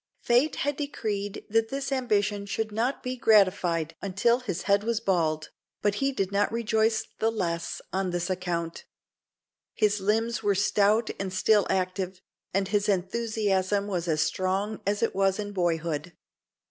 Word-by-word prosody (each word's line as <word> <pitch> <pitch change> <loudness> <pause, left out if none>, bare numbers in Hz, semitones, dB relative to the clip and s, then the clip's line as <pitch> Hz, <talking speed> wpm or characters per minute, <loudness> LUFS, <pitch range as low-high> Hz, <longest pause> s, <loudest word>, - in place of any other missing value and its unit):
Fate 250 +5 +3
had 290 0 -1
decreed 210 -9 -3
that 225 +1 +1
this 275 +2 -3
ambition 210 -6 0
should 215 +2 -2
not 235 +6 -1
be 255 0 -2
gratified 185 -8 +3
until 210 +5 +2
his 210 -8 -4
head 200 +1 +3
was 230 0 0
bald; 160 -7 0 0.3
but 205 - +3
he 275 0 +2
did 195 -7 -2
not 200 +1 +1
rejoice 220 -1 +1
the 225 - +2
less 170 -6 -2
on 190 0 0
this 175 0 -2
account. 175 -3 -3 0.9
His 210 -1 +2
limbs 225 +4 0
were 205 -2 +2
stout 210 +3 +2
and 195 -1 -3
still 205 +2 +3
active, 185 0 -1 0.3
and 195 0 0
his 205 0 +1
enthusiasm 200 0 0
was 180 -4 -2
as 155 -2 +2
strong 190 +6 -1
as 205 +2 +1
it 230 - +1
was 195 0 +2
in 205 -1 -4
boyhood. 170 -2 -1
200 Hz, 155 wpm, -27 LUFS, 185-225 Hz, 0.9 s, Fate